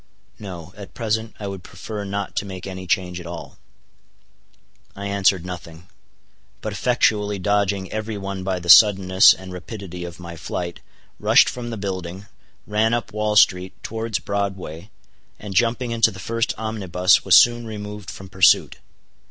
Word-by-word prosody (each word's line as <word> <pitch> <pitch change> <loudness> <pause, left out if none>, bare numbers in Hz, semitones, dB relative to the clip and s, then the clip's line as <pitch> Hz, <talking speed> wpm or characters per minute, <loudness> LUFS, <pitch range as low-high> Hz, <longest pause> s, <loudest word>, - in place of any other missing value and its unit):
"No: 90 -4 -9
at 100 -1 -11
present 110 -1 -2
I 105 - -5
would 100 -2 -5
prefer 100 +5 -7
not 100 0 -4
to - - 0
make 95 -2 -8
any 95 -1 -7
change 90 0 0
at 85 - -9
all." 85 0 -9 1.4
I 100 - -7
answered 100 -3 +2
nothing; 85 -2 -9 0.7
but - - -5
effectually 105 -1 +1
dodging 100 0 0
every 110 0 -4
one 95 -1 -5
by 95 -1 -1
the 85 - -9
suddenness 95 -1 +7
and 95 -1 -4
rapidity 90 -1 -8
of 85 0 -8
my 85 -1 -8
flight, 85 +2 -5 0.4
rushed - - +5
from 120 -1 -4
the 115 - -5
building, 95 -1 -5 0.4
ran 110 +2 +1
up 120 -4 -4
Wall 105 0 -1
street 95 -3 +4
towards 110 -1 -3
Broadway, 95 -3 -4 0.5
and 105 -2 -8
jumping 120 +3 +1
into 115 -1 +4
the 100 - -11
first 115 +4 -2
omnibus 95 -5 +2
was - - +5
soon 120 -1 +5
removed 105 -2 -7
from 95 - -9
pursuit. 95 0 +4
100 Hz, 155 wpm, -22 LUFS, 90-105 Hz, 1.4 s, suddenness